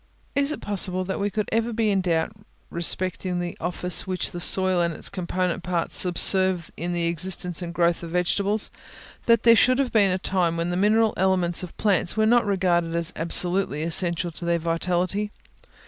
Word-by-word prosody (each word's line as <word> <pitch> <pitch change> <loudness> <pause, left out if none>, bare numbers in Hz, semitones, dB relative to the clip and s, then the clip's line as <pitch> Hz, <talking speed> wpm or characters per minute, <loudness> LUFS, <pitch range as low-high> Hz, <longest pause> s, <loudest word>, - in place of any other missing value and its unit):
Is 280 +1 +1
it - - -5
possible 185 -2 0
that 190 - -4
we 200 +1 0
could 215 0 -3
ever 230 +1 0
be 220 -2 0
in 195 -1 +1
doubt 165 -1 0 0.4
respecting 180 +1 -1
the 175 -1 -4
office 180 +1 -2
which 185 -1 -2
the 175 - -6
soil 185 0 +2
and 170 -1 -1
its - - -6
component 185 -1 -3
parts 175 -1 -2
subserve 185 -1 +3
in 175 +2 -4
the 170 -1 -1
existence 175 +1 0
and 170 -1 -5
growth 170 0 +1
of 170 - -7
vegetables? 200 +4 0 0.6
that 230 -1 +4
there 230 -1 +7
should 255 +2 +4
have 270 -2 0
been 205 -3 +4
a 185 - 0
time 180 -3 -1
when 170 +1 -2
the 175 - -2
mineral 215 +3 +2
elements 180 -2 +1
of 180 -2 -9
plants 195 -2 0
were 215 - +3
not 235 0 +3
regarded 175 -4 0
as 170 +1 0
absolutely 170 -1 +1
essential 170 +1 +1
to 165 - -8
their 170 0 +1
vitality? 175 +5 -1
180 Hz, 190 wpm, -24 LUFS, 170-200 Hz, 0.6 s, there